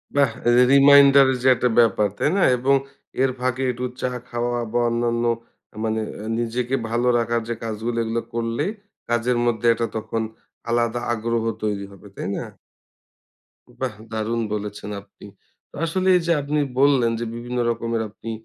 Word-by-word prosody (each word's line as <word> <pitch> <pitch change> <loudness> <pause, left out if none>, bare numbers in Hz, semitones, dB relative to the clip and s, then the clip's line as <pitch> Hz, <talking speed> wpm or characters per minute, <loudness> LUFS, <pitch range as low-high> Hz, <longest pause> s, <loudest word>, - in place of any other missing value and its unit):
বাহ! 140 -3 +4 0.2
এই 120 - +5
যে 125 - +7
রিমাইন্ডারের 140 -1 +7
যে - - +3
একটা 125 +1 +1
ব্যাপার 105 -2 +4
তাই - - +1
না? - - +2 0.2
এবং 135 +3 +3 0.5
এর 135 - +2
ফাঁকে 130 0 -1
একটু 125 +1 -4 0.2
চা 125 - 0 0.2
খাওয়া 120 0 -1
বা 120 - +1
অন্যান্য 120 0 0 0.6
মানে 110 0 0 0.4
নিজেকে 120 +2 -1
ভালো 120 +2 0
রাখার 115 0 0
যে - - 0
কাজগুলো 115 +1 -3
এগুলো 115 +1 -2
করলে 115 +3 -1 0.5
কাজের 120 +1 +1
মধ্যে 120 0 -1
একটা 115 0 -2
তখন 110 +1 -3 0.5
আলাদা 120 0 +1
আগ্রহ 115 0 -1 0.2
তৈরি 100 -2 -2
হবে। 100 +1 -14
তাই - - -5
না? - - -3 1.4
বাহ! 130 -4 -2 0.2
দারুন 110 +1 -1
বলেছেন 105 0 -5
আপনি। 100 +1 -17 0.6
আসলে 185 +3 -1
এই - - -1
যে - - +3
আপনি 145 +2 -1 0.2
বললেন 135 -4 +4
যে, 120 - -3
বিভিন্ন 120 +1 -4
রকমের 115 0 -1
আপনি 115 +2 -8
120 Hz, 155 wpm, -22 LUFS, 115-125 Hz, 1.4 s, যে